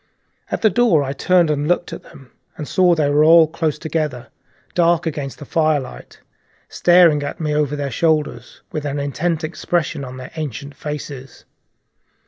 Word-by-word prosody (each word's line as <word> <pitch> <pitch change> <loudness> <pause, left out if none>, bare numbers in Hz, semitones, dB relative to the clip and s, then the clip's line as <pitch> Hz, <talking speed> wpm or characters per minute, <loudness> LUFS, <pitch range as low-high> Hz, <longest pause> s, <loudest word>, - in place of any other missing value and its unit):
At - - -3
the 220 - +5
door 180 -8 +3
I 135 0 -3
turned 175 +2 +2
and 145 0 -1
looked 175 +1 0
at - - -7
them, 135 -2 -17 0.3
and 150 - -6
saw 180 -2 +3
they 155 -3 +1
were 150 +1 +4
all 165 +1 +7
close 160 -1 -2
together, 150 -7 -3 0.4
dark 170 0 +2
against 145 -4 -4
the 145 - -10
firelight, 155 -4 -2 0.5
staring 175 -4 +4
at 145 - -5
me 155 -2 -1
over 150 -1 0
their 140 -2 -3
shoulders, 150 -4 -1
with 155 - -4
an 145 -1 -3
intent 155 +4 -2
expression 155 -2 -2
on 130 -1 -8
their 130 0 -9
ancient 145 -2 -6
faces. 145 -3 -8
150 Hz, 165 wpm, -19 LUFS, 140-165 Hz, 0.5 s, all